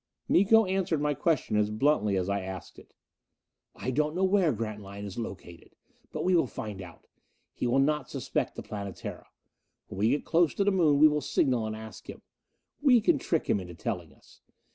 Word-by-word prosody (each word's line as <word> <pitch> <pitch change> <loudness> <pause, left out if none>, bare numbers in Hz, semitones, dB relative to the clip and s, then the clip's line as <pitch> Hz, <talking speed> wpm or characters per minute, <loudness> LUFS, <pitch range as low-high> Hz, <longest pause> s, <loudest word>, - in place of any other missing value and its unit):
Miko 220 +4 +5
answered 185 -4 0
my 150 0 +1
question 150 -5 0
as 105 0 +2
bluntly 105 -3 +1
as 90 0 -1
I 100 0 -1
asked 95 -2 -8
it. - - -19 0.8
"I 130 - -3
don't 150 +4 0
know 185 - 0
where 190 -4 +3
Grantline 105 -3 -6
is 100 +3 -6
located. 90 -6 -9 0.4
But - - -4
we 185 0 +3
will 165 -6 +3
find 105 -4 -6
out. 85 -4 -12 0.5
He - - -2
will 120 +2 +2
not 145 0 +1
suspect - - -2
the - - -7
Planetara. 100 -3 -7 0.6
When 95 - -7
we 110 +2 +3
get 145 - 0
close 170 -1 +2
to 200 - +1
the 205 - +3
Moon, 165 -7 +3
we 155 +2 +8
will 150 0 0
signal 125 -4 +1
and 110 - -4
ask 110 -2 -10
him. - - -9 0.6
We 265 -4 +6
can 285 +7 +2
trick 165 - -1
him 105 - +1
into 90 -2 -9
telling - - -4
us. - - -22
130 Hz, 195 wpm, -28 LUFS, 105-165 Hz, 0.8 s, we